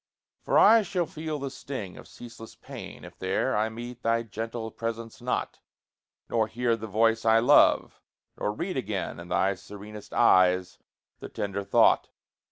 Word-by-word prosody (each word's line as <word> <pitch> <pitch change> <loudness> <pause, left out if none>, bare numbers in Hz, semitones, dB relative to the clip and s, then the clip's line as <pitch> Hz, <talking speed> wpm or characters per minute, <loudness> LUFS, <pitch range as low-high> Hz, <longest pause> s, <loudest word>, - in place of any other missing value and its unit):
For - - +1
I 225 +2 +7
shall 190 -4 -1
feel 155 -1 -5
the 140 -1 -5
sting 130 -9 -7
of - - -12
ceaseless 115 -2 -12
pain - - -10
If - - -14
there - - 0
I 110 +1 +1
meet 120 +2 -8
thy 115 0 +1
gentle 115 +1 -5
presence 115 +1 -6
not; 125 - -3 0.7
Nor 110 -2 +1
hear 120 +1 0
the 110 0 -7
voice 115 +2 +2
I 110 0 +5
love, 125 +6 +4 0.3
nor 105 - -2
read 175 - -4
again 105 -8 -3
In 85 - -9
thy 95 +2 +1
serenest 105 +2 -11
eyes 90 0 +3 0.4
the - - -8
tender 100 0 -4
thought. - - +3
115 Hz, 160 wpm, -27 LUFS, 105-120 Hz, 0.7 s, I